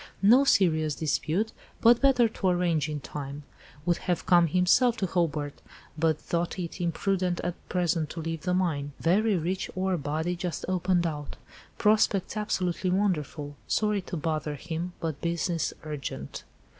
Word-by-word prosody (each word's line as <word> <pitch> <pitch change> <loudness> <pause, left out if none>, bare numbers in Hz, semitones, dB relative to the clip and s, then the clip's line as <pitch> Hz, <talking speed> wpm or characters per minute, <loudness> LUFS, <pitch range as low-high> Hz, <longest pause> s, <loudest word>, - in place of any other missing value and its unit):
No 245 +7 +7
serious 160 - +3
dispute, 165 +7 0 0.3
but 235 +1 +5
better 260 -4 +5
to 215 -3 -3
arrange 175 -4 +1
in 150 -1 -4
time. 145 +1 -6 0.4
Would 175 -1 +2
have 175 -2 -2
come 175 -1 +5
himself 190 - +3
to 200 - 0
Hobart, 155 -5 -1 0.3
but 160 0 +2
thought 170 +2 -2
it 175 -1 -5
imprudent 180 +1 0
at 175 - -1 0.2
present 170 -4 0
to 170 - -6
leave 165 -1 -4
the 180 +1 0
mine. 145 -6 -1
Very 200 +4 +3
rich 180 +3 -2
ore 185 0 0
body 160 +4 -2
just 175 -1 -4
opened 180 -1 +1
out. 150 -3 -4 0.4
Prospects 210 -2 +2
absolutely 185 -3 -1
wonderful. 160 -6 -1
Sorry 210 -2 +1
to 180 -1 -5
bother 155 -1 -2
him, 170 +4 -5
but 160 -4 -4
business 170 -1 -1
urgent." 145 - -6
175 Hz, 150 wpm, -28 LUFS, 155-185 Hz, 0.4 s, No